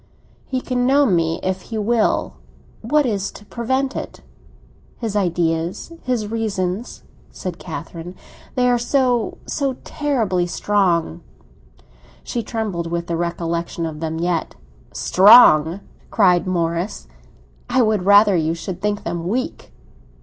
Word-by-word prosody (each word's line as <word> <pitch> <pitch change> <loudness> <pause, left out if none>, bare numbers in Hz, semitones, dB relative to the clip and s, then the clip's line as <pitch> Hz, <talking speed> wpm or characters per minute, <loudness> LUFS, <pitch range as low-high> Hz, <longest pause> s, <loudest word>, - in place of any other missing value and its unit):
"He 260 -1 -2
can 250 -1 -1
know 280 +2 +4
me 165 -7 +1
if 185 0 -1
he 225 - -3
will. 220 +1 +1 0.5
What 295 +6 +2
is 200 -5 -1
to 210 - -13
prevent 260 +5 -2
it?" - - -6 0.8
"His 225 -4 -4
ideas, 170 - -1
his 245 -4 -1
reasons," 210 -2 -3 0.3
said 180 -2 -6
Catherine. 165 +2 -7 0.4
"They 250 -1 +2
are 245 -1 +3
so—so 260 +2 0
terribly 225 - -1
strong." 175 - 0 1.0
She 240 - -3
trembled 215 -8 -3
with 170 0 -2
the 170 - -2
recollection 170 0 -2
of 155 -2 -5
them 160 0 -3
yet. 170 -1 -1 0.4
"Strong?" 190 -4 +6 0.3
cried 185 -5 +3
Morris. 170 - -2 0.6
"I 255 - +3
would 215 -4 +1
rather 205 +1 +6
you 165 -1 0
should 180 +2 -6
think 205 0 -1
them 170 0 -4
weak." 250 +7 -3
195 Hz, 125 wpm, -20 LUFS, 170-235 Hz, 1.0 s, Strong